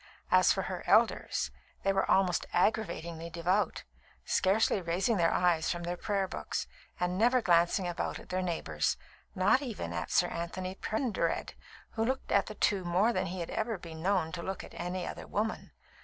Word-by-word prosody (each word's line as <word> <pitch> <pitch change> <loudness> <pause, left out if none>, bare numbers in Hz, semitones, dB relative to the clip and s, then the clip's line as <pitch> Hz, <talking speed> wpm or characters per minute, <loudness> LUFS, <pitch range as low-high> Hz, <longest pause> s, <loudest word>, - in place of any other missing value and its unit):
As - - +6
for - - 0
her - - -4
elders, 65 - +3 0.3
they 195 - +2
were 195 - +1
almost 185 -3 +3
aggravatingly 170 -4 0
devout, 175 +5 0 0.4
scarcely 195 +1 +2
raising 185 +6 +1
their 165 -2 +3
eyes 175 -3 +2
from 175 -1 -2
their 175 +1 -2
prayer 195 +1 -1
books, - - -3 0.3
and 180 +1 0
never 245 +3 +5
glancing 175 -1 +3
about 175 - -2
at - - -13
their 185 +1 0
neighbours, 160 - -1 0.4
not 200 +8 +4
even 215 - -4
at 85 - -3
Sir 175 - +3
Anthony 185 +2 -4
Pendered, 220 +3 -1 0.4
who 225 - -1
looked 260 +3 -2
at 200 - +3
the 215 - -7
two 200 -2 +1
more 185 +7 +2
than 185 -1 0
he 180 +1 -4
had 170 - -5
ever 220 -1 -1
been 165 -2 -9
known 180 -3 +1
to 175 0 -5
look 190 +2 -4
at - - -12
any 180 +1 -3
other - - -7
women. 220 +2 -2
185 Hz, 180 wpm, -31 LUFS, 170-205 Hz, 0.4 s, As